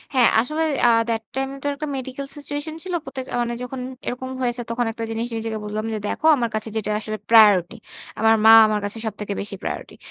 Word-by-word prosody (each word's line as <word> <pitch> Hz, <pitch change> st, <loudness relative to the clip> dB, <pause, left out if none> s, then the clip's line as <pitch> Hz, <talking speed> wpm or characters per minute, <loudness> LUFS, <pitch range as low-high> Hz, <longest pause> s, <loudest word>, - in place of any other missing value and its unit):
হ্যাঁ, 245 Hz, -3 st, +6 dB
আসলে 305 Hz, +6 st, -2 dB, 0.2 s
আ -, -, +6 dB, 0.2 s
that 225 Hz, -1 st, 0 dB
time 270 Hz, 0 st, -1 dB
এ -, -, -9 dB
তো -, -, -1 dB
একটা 305 Hz, +1 st, -5 dB
মেডিকেল 265 Hz, +1 st, -6 dB
সিচুয়েশন 290 Hz, +2 st, -5 dB
ছিল। 370 Hz, -1 st, -5 dB
প্রত্যেক 260 Hz, -5 st, -6 dB, 0.2 s
মানে 240 Hz, 0 st, -1 dB
যখন 255 Hz, +1 st, -6 dB, 0.3 s
এরকম 260 Hz, +1 st, -4 dB
হয়েছে 245 Hz, 0 st, -1 dB
তখন 235 Hz, +1 st, 0 dB
একটা 230 Hz, 0 st, -6 dB
জিনিস 225 Hz, +1 st, -2 dB
নিজেকে 225 Hz, -1 st, -3 dB
বললাম 215 Hz, +1 st, -3 dB
যে, -, -, -1 dB
"দেখো -, -, -3 dB
আমার 235 Hz, -3 st, -1 dB
কাছে 215 Hz, +1 st, -3 dB
যেটা 215 Hz, -1 st, -2 dB
আসলে 215 Hz, 0 st, -5 dB
প্রায়োরিটি। 205 Hz, -6 st, +6 dB, 0.4 s
আমার 225 Hz, 0 st, +5 dB
মা 225 Hz, -, +10 dB
আমার 210 Hz, -1 st, 0 dB
কাছে 205 Hz, +2 st, -4 dB
সবথেকে 210 Hz, -1 st, -4 dB
বেশি 205 Hz, 0 st, -6 dB
প্রায়োরিটি।" -, -, -5 dB
235 Hz, 210 wpm, -22 LUFS, 215-265 Hz, 0.4 s, মা